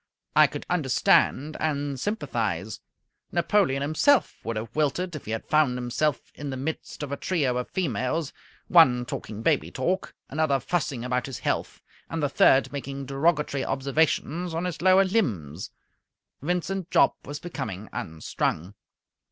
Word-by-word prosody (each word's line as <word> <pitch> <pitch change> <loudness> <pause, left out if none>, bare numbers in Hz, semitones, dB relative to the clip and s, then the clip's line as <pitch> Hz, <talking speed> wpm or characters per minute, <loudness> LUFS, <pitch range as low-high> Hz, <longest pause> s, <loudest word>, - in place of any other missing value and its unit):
I - - +7
could - - -7
understand 150 +3 +2
and 145 -3 -1
sympathize. 210 - -2 0.5
Napoleon 155 -10 +2
himself 240 - +2
would 115 - -3
have 115 +2 -6
wilted 155 +4 0
if 150 - -8
he 110 - -5
had 110 - -3
found 150 -5 +3
himself 125 +4 -1
in 145 -1 -6
the 130 - -4
midst 150 +2 -5
of 140 - -5
a 140 - -2
trio 145 -9 0
of 125 - -3
females, 150 - -1 0.3
one 130 -8 +6
talking 110 -2 -6
baby 150 0 +2
talk, 180 +9 -2
another 145 -2 +1
fussing 135 -4 -2
about 125 0 -1
his 135 - -5
health, - - -2 0.3
and 165 -2 -3
the 145 - +2
third 135 -1 +4
making 140 0 -5
derogatory 140 0 +1
observations 155 +4 0
on 170 +2 -1
his 175 -4 -4
lower 185 +1 +6
limbs. 100 - -1 0.7
Vincent 180 +3 -2
Jopp - - +4
was 145 +1 -5
becoming 110 - -5
unstrung. 80 +3 -3
145 Hz, 145 wpm, -26 LUFS, 125-165 Hz, 0.7 s, I